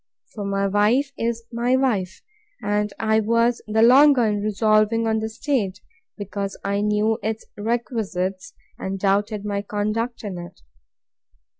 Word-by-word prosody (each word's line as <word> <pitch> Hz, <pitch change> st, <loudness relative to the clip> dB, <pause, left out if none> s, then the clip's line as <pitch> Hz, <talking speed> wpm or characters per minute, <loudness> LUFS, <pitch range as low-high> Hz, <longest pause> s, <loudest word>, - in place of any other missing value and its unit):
For 210 Hz, -, -5 dB
my 200 Hz, 0 st, 0 dB
wife 215 Hz, +8 st, +2 dB
is 230 Hz, 0 st, -2 dB
my 240 Hz, +2 st, +1 dB
wife; 215 Hz, -9 st, -1 dB, 0.4 s
and 210 Hz, 0 st, -1 dB
I 220 Hz, 0 st, +2 dB
was 230 Hz, +2 st, +2 dB
the 220 Hz, +1 st, +2 dB
longer 265 Hz, +1 st, +6 dB
in 210 Hz, -1 st, 0 dB
resolving 215 Hz, +2 st, +2 dB
on 220 Hz, 0 st, +1 dB
the 220 Hz, 0 st, -3 dB
state, 220 Hz, -5 st, -2 dB, 0.4 s
because 200 Hz, -1 st, -4 dB
I 200 Hz, +1 st, 0 dB
knew 210 Hz, +2 st, +1 dB
its 220 Hz, 0 st, -3 dB
requisites, 205 Hz, -4 st, -3 dB, 0.2 s
and 190 Hz, +1 st, -3 dB
doubted 205 Hz, +2 st, 0 dB
my 200 Hz, -1 st, -1 dB
conduct 215 Hz, +4 st, -2 dB
in 190 Hz, -4 st, -5 dB
it. 175 Hz, 0 st, -10 dB
215 Hz, 140 wpm, -23 LUFS, 200-230 Hz, 0.4 s, longer